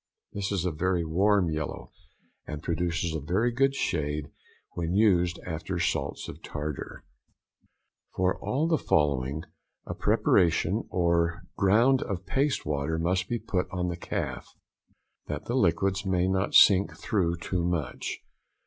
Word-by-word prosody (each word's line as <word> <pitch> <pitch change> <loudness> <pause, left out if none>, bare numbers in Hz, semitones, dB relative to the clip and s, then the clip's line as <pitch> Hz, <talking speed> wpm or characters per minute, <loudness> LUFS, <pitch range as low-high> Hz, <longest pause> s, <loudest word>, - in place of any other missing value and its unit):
This 100 0 -3
is 95 -3 -1
a 90 - +1
very 85 +2 0
warm 95 +2 +2
yellow, 75 -2 -4 0.6
and 75 0 -6
produces 85 0 -1
a 80 - -2
very 95 - +1
good 135 +3 +2
shade 75 - -2 0.4
when 85 +1 -2
used 90 -4 +3
after 90 +2 -4
salts 85 - -1
of - - -9
tartar. 75 -1 -6 1.1
For 95 0 +1
all 150 +5 0
the 165 -2 +2
following, 70 0 +1 0.4
a - - -4
preparation 85 -2 +2
or 85 -2 +1
ground 115 +7 +4
of 95 -3 -4
paste 135 +7 0
water 75 +1 -1
must 90 +3 0
be 120 - 0
put 90 -5 -2
on 90 -2 -2
the 85 - -3
calf, 85 - -4 0.8
that 75 0 -5
the 120 - -3
liquids 95 -3 +1
may 90 -2 +1
not 95 +1 0
sink 100 0 +6
through 85 -5 0
too 90 +1 -2
much. 85 -6 -3
90 Hz, 140 wpm, -28 LUFS, 80-100 Hz, 1.1 s, sink